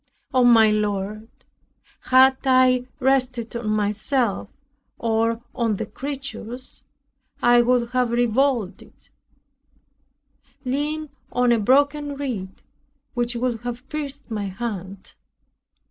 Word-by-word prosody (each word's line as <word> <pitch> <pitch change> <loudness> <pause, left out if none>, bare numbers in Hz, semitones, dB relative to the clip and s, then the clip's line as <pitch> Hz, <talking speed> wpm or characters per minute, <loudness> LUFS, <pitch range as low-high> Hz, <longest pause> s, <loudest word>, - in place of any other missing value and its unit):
O 255 -1 +4
my 225 -3 +6
Lord! 210 0 -2 0.8
Had 260 +1 +6
I 255 -1 +4
rested 255 -3 0
on 235 -2 -3
myself, 215 +1 0 0.5
or 230 0 0
on 230 -4 0
the - - -3
creatures, 265 -3 -7 0.6
I 240 0 +5
would 240 -1 +1
have 250 -1 +1
revolted; 240 -3 -1 1.6
"leaned 300 +4 -2 0.2
on 245 0 +2
a 235 - +3
broken 285 +5 +2
reed, 230 -10 -5 0.5
which 240 -2 -1
would 240 -1 -1
have 245 +3 -6
pierced 285 -3 -6
my 210 -2 -2
hand." 195 -2 -6
240 Hz, 100 wpm, -23 LUFS, 220-260 Hz, 1.6 s, my